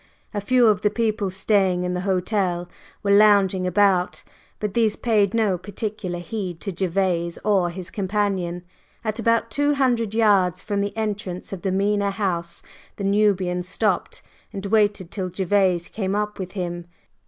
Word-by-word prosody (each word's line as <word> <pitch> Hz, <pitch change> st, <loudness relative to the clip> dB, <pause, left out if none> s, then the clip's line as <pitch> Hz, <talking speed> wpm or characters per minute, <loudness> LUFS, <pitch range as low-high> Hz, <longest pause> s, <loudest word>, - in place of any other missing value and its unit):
A 205 Hz, -, -2 dB
few 250 Hz, +3 st, +3 dB
of 215 Hz, -3 st, +3 dB
the 210 Hz, -, +3 dB
people 215 Hz, -2 st, -1 dB
staying 190 Hz, -1 st, +1 dB
in 180 Hz, 0 st, -1 dB
the 180 Hz, -, -2 dB
hotel 185 Hz, -2 st, 0 dB, 0.4 s
were 200 Hz, -, +1 dB
lounging 200 Hz, -3 st, +5 dB
about, 185 Hz, -1 st, +2 dB, 0.4 s
but 210 Hz, -2 st, -3 dB
these 220 Hz, -2 st, +2 dB
paid 210 Hz, -3 st, +1 dB
no 210 Hz, -6 st, +1 dB
particular 205 Hz, -1 st, -4 dB
heed 175 Hz, -1 st, -5 dB
to 200 Hz, -, -3 dB
Gervase 175 Hz, -1 st, -1 dB
or 195 Hz, -4 st, +3 dB
his 180 Hz, +1 st, -8 dB
companion. 190 Hz, -3 st, -1 dB, 0.4 s
At 215 Hz, 0 st, -2 dB
about 230 Hz, 0 st, +1 dB
two 290 Hz, +4 st, +2 dB
hundred 240 Hz, -6 st, +1 dB
yards 195 Hz, -5 st, +3 dB
from 205 Hz, -2 st, -2 dB
the 200 Hz, +2 st, -3 dB
entrance 205 Hz, -4 st, -4 dB
of 185 Hz, -, -6 dB
the 190 Hz, -, -1 dB
Mena 200 Hz, +1 st, +1 dB
House, 175 Hz, -4 st, -3 dB, 0.3 s
the 200 Hz, -, -6 dB
Nubian 195 Hz, -3 st, +2 dB
stopped 185 Hz, +4 st, -2 dB, 0.3 s
and 195 Hz, 0 st, -6 dB
waited 205 Hz, -3 st, +1 dB
till 185 Hz, -3 st, -3 dB
Gervase 185 Hz, -1 st, +1 dB
came 195 Hz, -2 st, -2 dB
up 210 Hz, 0 st, -2 dB
with 185 Hz, -1 st, -5 dB
him. 175 Hz, -3 st, -4 dB
195 Hz, 160 wpm, -23 LUFS, 180-210 Hz, 0.4 s, lounging